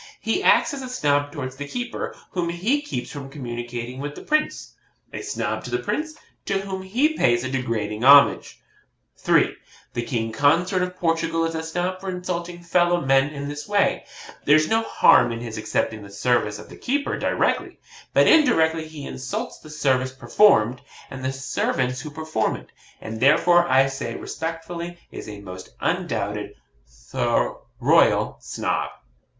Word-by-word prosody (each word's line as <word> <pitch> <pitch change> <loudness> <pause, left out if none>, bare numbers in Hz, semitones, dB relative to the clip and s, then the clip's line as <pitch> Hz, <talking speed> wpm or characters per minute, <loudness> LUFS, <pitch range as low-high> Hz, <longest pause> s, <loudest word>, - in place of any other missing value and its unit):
He - - 0
acts - - +4
as 275 - -5
a 255 - -6
Snob 145 - +1
towards 130 -2 -6
the 145 0 -5
keeper, 245 +7 -4 0.2
whom 175 -2 -1
he 210 +12 0
keeps 290 - -5
from 140 -2 -7
communication 120 -2 -6
with 145 +1 -5
the - - -10
Prince 305 0 -1 0.4
a - - -5
Snob - - -3
to - - -6
the 370 - 0
Prince, 315 -4 -3 0.3
to 195 - +1
whom 190 -1 -5
he 250 +12 +1
pays 120 - +2
a 130 - -3
degrading 115 -4 -2
homage. 140 +1 +6 0.6
3. - - +2 0.4
The 120 - -1
King 115 -2 -2
Consort 170 - +2
of 180 0 -3
Portugal 165 -1 0
is 165 - -2
a 160 - -2
Snob 180 +3 -3
for 195 - -4
insulting 175 -1 -4
fellow 175 0 +2
men 135 -1 +3
in 140 -1 -5
this 145 +1 -6
way. 205 -1 +1 0.4
There's 155 +2 +5
no 225 0 +2
harm 120 - +5
in 115 - -4
his 115 -2 -6
accepting 110 0 -1
the 100 - -11
services 105 0 0
of - - -11
the - - -12
keeper 285 +3 -1
directly; - - 0 0.3
but - - +5
indirectly 165 - +4
he 155 -3 -9
insults 130 0 -5
the 155 - -14
service 130 -4 +1
performed, 130 - +3 0.3
and 130 0 -7
the 130 - 0
servants 130 -1 -1
who 155 - -7
perform 155 -7 -1
it; - - -12 0.3
and 110 0 -6
therefore, 175 +6 +5
I 135 +1 +5
say, 135 -4 -4
respectfully, 170 +1 -5
is - - -8
a 105 -1 -8
most 95 -2 -9
undoubted, - - -2 0.6
though - - 0
royal - - +3
Snob. - - -2
150 Hz, 165 wpm, -23 LUFS, 130-180 Hz, 0.6 s, homage